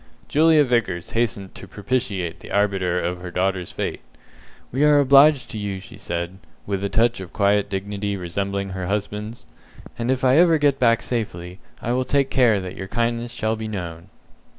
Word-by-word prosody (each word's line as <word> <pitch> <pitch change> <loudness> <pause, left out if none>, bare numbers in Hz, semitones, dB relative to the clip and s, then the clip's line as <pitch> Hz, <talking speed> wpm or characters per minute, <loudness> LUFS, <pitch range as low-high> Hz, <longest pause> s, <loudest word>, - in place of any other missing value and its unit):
Julia 155 0 +5
Vickers 115 -10 -1
hastened 105 -5 -1
to - - -11
propitiate 100 -6 -2
the - - -12
arbiter 95 -3 +1
of 90 +1 -3
her 90 - -6
daughter's 90 0 -1
fate. - - -4 0.7
"We 135 +4 +1
are 150 -1 +6
obliged 140 0 +5
to 110 - -5
you," 100 -2 -3
she 95 - -12
said, 85 +2 -4 0.3
with 100 -1 -2
a 100 - -1
touch 115 +3 +2
of 95 -1 -8
quiet 100 0 +2
dignity 100 +1 -3
resembling 100 +2 -3
her 95 -1 -4
husband's; 105 +3 -4 0.5
"and 120 +1 -2
if 130 -1 0
I 130 +2 +5
ever 170 -2 +5
get 145 -2 +2
back 115 -1 +3
safely, 90 -6 -4 0.2
I 120 - -1
will 130 +1 +1
take 135 +1 +1
care 120 -6 +4
that 95 -1 -7
your 95 - -6
kindness 115 +2 -1
shall 110 -2 -1
be 110 0 -5
known." 90 -3 -6
105 Hz, 180 wpm, -22 LUFS, 95-120 Hz, 0.7 s, are